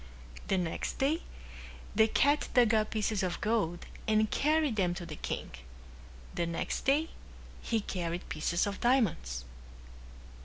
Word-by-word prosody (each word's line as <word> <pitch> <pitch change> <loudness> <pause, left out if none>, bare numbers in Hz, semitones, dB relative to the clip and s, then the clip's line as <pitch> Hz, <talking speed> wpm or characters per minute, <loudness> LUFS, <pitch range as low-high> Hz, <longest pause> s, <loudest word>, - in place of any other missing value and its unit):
The 190 - +2
next 175 -3 -2
day 300 +6 +1 0.7
the 220 +1 +6
cat 285 +6 +2
dug 240 -3 +5
up 215 -1 +2
pieces 215 -1 0
of 180 -2 -2
gold 205 -6 0 0.2
and 215 0 +3
carried 300 -3 +2
them 180 -4 +1
to 175 -1 -6
the 155 -2 -7
king. - - -4 0.8
The 170 - -1
next 170 0 -3
day 300 +4 +3 0.5
he 225 -2 0
carried 175 -3 -3
pieces 165 +3 0
of 200 -1 -4
diamonds. 165 - +1
215 Hz, 140 wpm, -31 LUFS, 175-245 Hz, 0.8 s, the